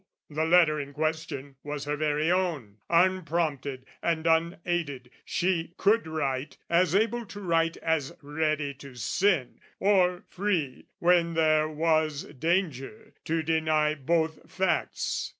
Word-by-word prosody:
The 155 Hz, +2 st, 0 dB
letter 160 Hz, -2 st, +5 dB
in 140 Hz, 0 st, -6 dB
question 150 Hz, -3 st, -3 dB
was 145 Hz, -1 st, -5 dB
her 145 Hz, 0 st, -1 dB
very 150 Hz, +2 st, +1 dB
own, 160 Hz, -, -1 dB
Unprompted 165 Hz, -7 st, +1 dB, 0.2 s
and 165 Hz, -1 st, 0 dB
unaided: 165 Hz, -5 st, 0 dB
she 175 Hz, -1 st, -1 dB
could 210 Hz, -2 st, +3 dB
write 140 Hz, -3 st, -2 dB
As 175 Hz, 0 st, +3 dB
able 230 Hz, +3 st, +2 dB
to 200 Hz, -, -9 dB
write 165 Hz, -3 st, +1 dB
as 160 Hz, -4 st, -1 dB
ready 150 Hz, -1 st, -1 dB
to 140 Hz, -1 st, -12 dB
sin, 155 Hz, -, 0 dB, 0.2 s
or 185 Hz, -3 st, +3 dB
free, 180 Hz, -9 st, -2 dB
When 170 Hz, -1 st, +3 dB
there 155 Hz, -1 st, +3 dB
was 155 Hz, -1 st, +1 dB
danger, 155 Hz, -, -2 dB
to 160 Hz, 0 st, 0 dB
deny 155 Hz, -1 st, +2 dB
both 160 Hz, +2 st, -1 dB
facts. 190 Hz, -1 st, -1 dB
160 Hz, 125 wpm, -28 LUFS, 145-175 Hz, 0.2 s, letter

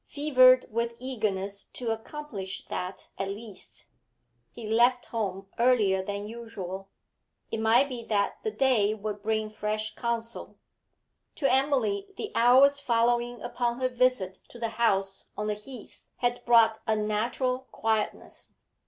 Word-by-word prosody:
Fevered 255 Hz, -3 st, +5 dB
with 235 Hz, +1 st, -2 dB
eagerness 205 Hz, -6 st, -2 dB
to 240 Hz, -3 st, -4 dB
accomplish 225 Hz, -4 st, -6 dB
that 185 Hz, +1 st, -5 dB
at 195 Hz, -, -1 dB
least, 205 Hz, 0 st, -7 dB, 0.6 s
he 235 Hz, -, -9 dB
left 240 Hz, +3 st, +3 dB
home 195 Hz, -4 st, -3 dB
earlier 215 Hz, -6 st, +3 dB
than 200 Hz, +1 st, -4 dB
usual. 195 Hz, -4 st, -7 dB, 0.6 s
It 225 Hz, -, -2 dB
might 230 Hz, +5 st, +4 dB
be 250 Hz, -4 st, -6 dB
that 200 Hz, -2 st, 0 dB
the 440 Hz, -, -1 dB
day 240 Hz, -, +2 dB
would 210 Hz, -1 st, -5 dB
bring 215 Hz, 0 st, -1 dB
fresh 215 Hz, 0 st, -2 dB
counsel. 235 Hz, -1 st, -4 dB, 0.8 s
To 275 Hz, -4 st, +1 dB
Emily 290 Hz, +10 st, +1 dB
the 425 Hz, -, -5 dB
hours 265 Hz, +4 st, +6 dB
following 240 Hz, -2 st, +1 dB
upon 240 Hz, 0 st, -1 dB
her 255 Hz, 0 st, +1 dB
visit 245 Hz, -7 st, +1 dB
to -, -, -12 dB
the 230 Hz, -1 st, -2 dB
house 195 Hz, -4 st, 0 dB
on 210 Hz, -, -2 dB
the 210 Hz, -, 0 dB
Heath 215 Hz, +3 st, -11 dB
had 245 Hz, 0 st, -1 dB
brought 225 Hz, -2 st, +5 dB
unnatural 225 Hz, +4 st, 0 dB
quietness. 220 Hz, -1 st, -2 dB
230 Hz, 135 wpm, -28 LUFS, 210-250 Hz, 0.8 s, hours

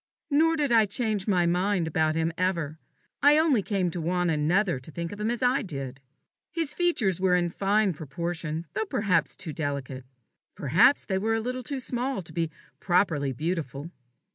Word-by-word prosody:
Nor 325 Hz, +3 st, +4 dB
did 290 Hz, -4 st, 0 dB
I 225 Hz, -2 st, +5 dB
change 215 Hz, -1 st, -1 dB
my 180 Hz, -4 st, +3 dB
mind 180 Hz, +1 st, +1 dB
about 155 Hz, 0 st, +1 dB
him 165 Hz, 0 st, 0 dB
ever 170 Hz, -4 st, -1 dB, 0.4 s
I 290 Hz, +1 st, +6 dB
only 310 Hz, -8 st, +3 dB
came 190 Hz, -3 st, -1 dB
to 175 Hz, -, -4 dB
want 175 Hz, +1 st, 0 dB
another 165 Hz, +2 st, +1 dB
to 130 Hz, -, -12 dB
think 170 Hz, +1 st, -5 dB
of 205 Hz, -, -8 dB
him 210 Hz, +1 st, 0 dB
as 240 Hz, +1 st, -2 dB
I 250 Hz, +3 st, +3 dB
did. 135 Hz, -, -6 dB, 0.5 s
His 325 Hz, -3 st, -1 dB
features 260 Hz, -, +1 dB
were 185 Hz, -1 st, +3 dB
in 175 Hz, -1 st, +1 dB
fine 200 Hz, +2 st, +1 dB
proportion, 165 Hz, +2 st, -4 dB
though 440 Hz, -, -1 dB
perhaps 205 Hz, -, 0 dB
too 160 Hz, -5 st, -6 dB
delicate. 140 Hz, -4 st, -4 dB, 0.5 s
Perhaps 165 Hz, -, +4 dB
they 190 Hz, -2 st, -1 dB
were 225 Hz, +3 st, +1 dB
a -, -, 0 dB
little 250 Hz, +3 st, -3 dB
too 275 Hz, +2 st, -4 dB
small 250 Hz, -3 st, -2 dB
to -, -, -9 dB
be 165 Hz, -2 st, -1 dB, 0.3 s
properly 175 Hz, -7 st, +1 dB
beautiful. 155 Hz, +1 st, -4 dB
180 Hz, 180 wpm, -27 LUFS, 160-225 Hz, 0.5 s, I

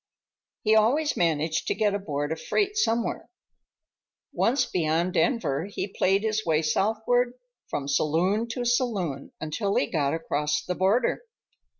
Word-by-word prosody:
He 215 Hz, -, +3 dB
always 255 Hz, +8 st, +3 dB
managed 160 Hz, -2 st, 0 dB
to -, -, 0 dB
get 205 Hz, -1 st, +1 dB
aboard 145 Hz, -7 st, -3 dB
a -, -, 0 dB
freight 410 Hz, -, -1 dB
somewhere. 235 Hz, -, 0 dB, 1.0 s
Once 255 Hz, +5 st, +2 dB
beyond 170 Hz, +1 st, 0 dB
Denver, 170 Hz, -, +1 dB
he 205 Hz, -, -4 dB
played 195 Hz, +2 st, +2 dB
his 220 Hz, 0 st, 0 dB
way 160 Hz, -1 st, +1 dB
southward 220 Hz, +9 st, +1 dB, 0.3 s
from 140 Hz, -1 st, -4 dB
saloon 175 Hz, +10 st, +1 dB
to 240 Hz, +1 st, -4 dB
saloon 205 Hz, -, -1 dB
until 195 Hz, +6 st, -2 dB
he -, -, +3 dB
got 145 Hz, 0 st, 0 dB
across 150 Hz, -2 st, -1 dB
the 180 Hz, -, -1 dB
border. 200 Hz, +7 st, +1 dB
195 Hz, 135 wpm, -26 LUFS, 155-230 Hz, 1.0 s, He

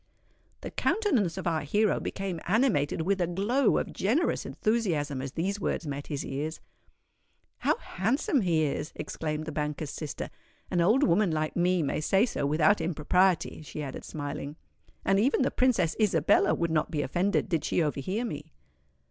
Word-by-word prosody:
The -, -, -6 dB
countenance 245 Hz, -, +1 dB
of 190 Hz, -, -5 dB
our 165 Hz, -3 st, +1 dB
hero 205 Hz, +9 st, +1 dB
became 190 Hz, -4 st, -4 dB
animated 180 Hz, -, +2 dB
with 195 Hz, +2 st, +1 dB
a 175 Hz, -, +2 dB
glow 210 Hz, +9 st, +2 dB
of -, -, -2 dB
generous 260 Hz, -, 0 dB
enthusiasm 165 Hz, -, 0 dB
as 135 Hz, -1 st, -6 dB
these 195 Hz, +5 st, -1 dB
words 175 Hz, -, -2 dB
met 145 Hz, -1 st, -5 dB
his 145 Hz, -3 st, -3 dB
ears. 150 Hz, +4 st, -4 dB, 1.0 s
"How -, -, +2 dB
handsome 270 Hz, -, 0 dB
he 165 Hz, -5 st, +2 dB
is!" 150 Hz, +1 st, -2 dB
exclaimed 155 Hz, -1 st, -4 dB
the 155 Hz, -, -4 dB
banker's 150 Hz, 0 st, -3 dB
sister. 155 Hz, -3 st, -5 dB, 0.4 s
"An 175 Hz, -, +2 dB
old 220 Hz, +11 st, +4 dB
woman 185 Hz, 0 st, +3 dB
like 155 Hz, -1 st, -1 dB
me 180 Hz, -1 st, +2 dB
may 145 Hz, -, -1 dB
say 195 Hz, +7 st, +3 dB
so 145 Hz, -, -2 dB
without 155 Hz, +6 st, +3 dB
impropriety," 170 Hz, +2 st, +1 dB
she 150 Hz, 0 st, -6 dB
added 135 Hz, -2 st, -6 dB
smiling; 145 Hz, -1 st, -5 dB, 0.5 s
"and 195 Hz, 0 st, +3 dB
even 260 Hz, +4 st, +3 dB
the -, -, +1 dB
Princess 220 Hz, -11 st, +2 dB
Isabella 210 Hz, -3 st, +3 dB
would 170 Hz, -1 st, -1 dB
not 155 Hz, -1 st, +1 dB
be 150 Hz, -3 st, -1 dB
offended, 185 Hz, +11 st, 0 dB
did 165 Hz, -5 st, 0 dB
she 170 Hz, -, +1 dB
overhear 185 Hz, -, -2 dB
me." 150 Hz, -7 st, -6 dB
170 Hz, 165 wpm, -28 LUFS, 150-205 Hz, 1.0 s, old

